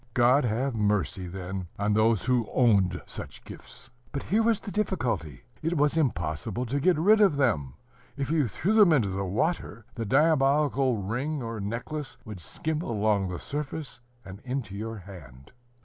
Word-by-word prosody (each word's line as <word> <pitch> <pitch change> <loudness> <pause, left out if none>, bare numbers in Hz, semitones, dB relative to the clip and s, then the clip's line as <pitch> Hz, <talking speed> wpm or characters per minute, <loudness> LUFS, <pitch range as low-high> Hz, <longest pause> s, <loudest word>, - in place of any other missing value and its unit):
God 125 +3 +4
have 120 +4 0
mercy, 100 -5 0
then, 95 0 -5
on 105 +1 +1
those 110 -1 +3
who 125 -3 +1
owned 100 -7 +3
such - - -8
gifts! - - -11 0.2
But 140 - -4
here 215 +4 +2
was 225 -1 +2
the 200 - -8
difficulty: 115 - -2 0.2
it 165 +2 -1
was 145 +1 +2
impossible 105 - -1
to 135 +4 -1
get 180 +4 +3
rid 210 +7 +5
of 195 -8 +5
them; 100 - 0 0.4
if 140 0 -2
you 155 -5 +2
threw 180 - -1
them 210 -6 +6
into 120 -10 +2
the 95 +1 -2
water, 110 - -2
the 115 - -4
diabolical 135 -1 +3
ring 125 +9 -3
or 115 -1 -4
necklace 120 +8 -4
would 105 -4 -8
skim 155 - -3
along 105 - +1
the 90 -1 -4
surface, 145 - -5 0.3
and 95 0 -9
into 125 -6 -4
your 110 +2 -5
hand. 75 -9 -12
120 Hz, 165 wpm, -27 LUFS, 100-150 Hz, 0.4 s, them